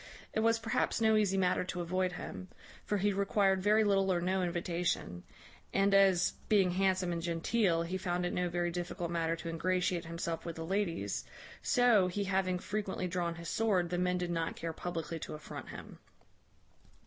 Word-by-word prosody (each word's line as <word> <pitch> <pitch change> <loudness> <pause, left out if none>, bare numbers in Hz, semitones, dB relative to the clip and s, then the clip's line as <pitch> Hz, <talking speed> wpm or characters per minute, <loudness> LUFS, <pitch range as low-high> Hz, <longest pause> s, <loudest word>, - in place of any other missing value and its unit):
It - - 0
was 225 +1 +3
perhaps 225 +2 0
no 220 -1 +4
easy 200 -3 +2
matter 180 -1 +2
to 180 - -4
avoid 185 +1 0
him; 185 +1 -7 0.4
for 210 - -1
he 205 +1 +1
required 195 -1 +2
very 210 +3 +4
little 195 -2 +3
or 175 - +2
no 185 +2 0
invitation; 170 - -2 0.5
and 195 +1 +3
as, 195 -3 +5 0.2
being 195 -4 +4
handsome 185 -1 +1
and 170 -1 -2
genteel, 170 +1 +1
he 185 +3 -3
found 180 -1 -1
it 175 - -2
no 180 0 0
very 175 0 -1
difficult 175 0 -4
matter 165 -1 0
to 170 0 -6
ingratiate 180 +1 0
himself 170 0 -4
with 170 -1 -5
the 165 - -5
ladies, 170 - -1 0.4
so, 235 -6 +4
he 200 +3 -2
having 190 -1 0
frequently 195 -1 -3
drawn 175 -1 -2
his 170 0 -8
sword, 190 -6 +1
the 175 - 0
men 180 0 +1
did 180 -1 -2
not 165 -1 -1
care 165 -1 -4
publickly 165 -1 -4
to - - -6
affront 150 - -8
him. - - -10
180 Hz, 185 wpm, -33 LUFS, 170-195 Hz, 0.5 s, as